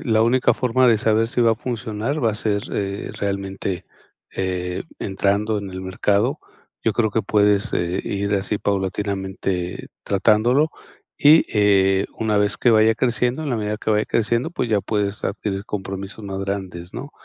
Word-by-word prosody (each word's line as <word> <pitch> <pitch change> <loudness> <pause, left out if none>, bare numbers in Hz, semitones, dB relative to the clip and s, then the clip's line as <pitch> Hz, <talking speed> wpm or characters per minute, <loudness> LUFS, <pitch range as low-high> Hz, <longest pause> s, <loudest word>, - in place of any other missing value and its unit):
la 110 -2 +2
única 125 +3 +3
forma 125 0 +2
de 115 -3 +4
saber 110 +1 +2
si 125 - -1
va 115 -1 +5
a - - 0
funcionar 120 +3 -3
va 110 - +3
a - - -5
ser, 105 -1 0
eh, 100 0 -3
realmente, 95 -2 -3 0.5
eh, 90 -1 -2 0.2
entrando 100 +2 0
en 100 -1 -6
el 95 0 -6
mercado. 100 +8 0 0.4
Yo 115 - +1
creo 110 -2 +1
que 110 - +1
puedes, 105 0 +2
eh, 85 +1 -1
ir 100 0 -1
así 100 +1 -1
paulatinamente 95 -2 -2 0.2
tratándolo, 115 +9 +3 0.5
y, 155 +3 +6
eh, 100 -2 +3
una 110 -2 +1
vez 105 0 +2
que 120 - +3
vaya 110 +1 +4
creciendo, 125 +4 0
en 145 - -2
la 125 - +1
medida 105 0 -2
que 110 - -3
vaya 105 0 +1
creciendo, 115 +6 0
pues 145 -8 -2
ya 105 -2 +2
puedes 100 0 -2
adquirir 100 0 -3
compromisos 100 +1 -6
más 95 0 -4
grandes, 95 -3 -5
¿no?, 140 - -7
105 Hz, 170 wpm, -22 LUFS, 95-115 Hz, 0.5 s, y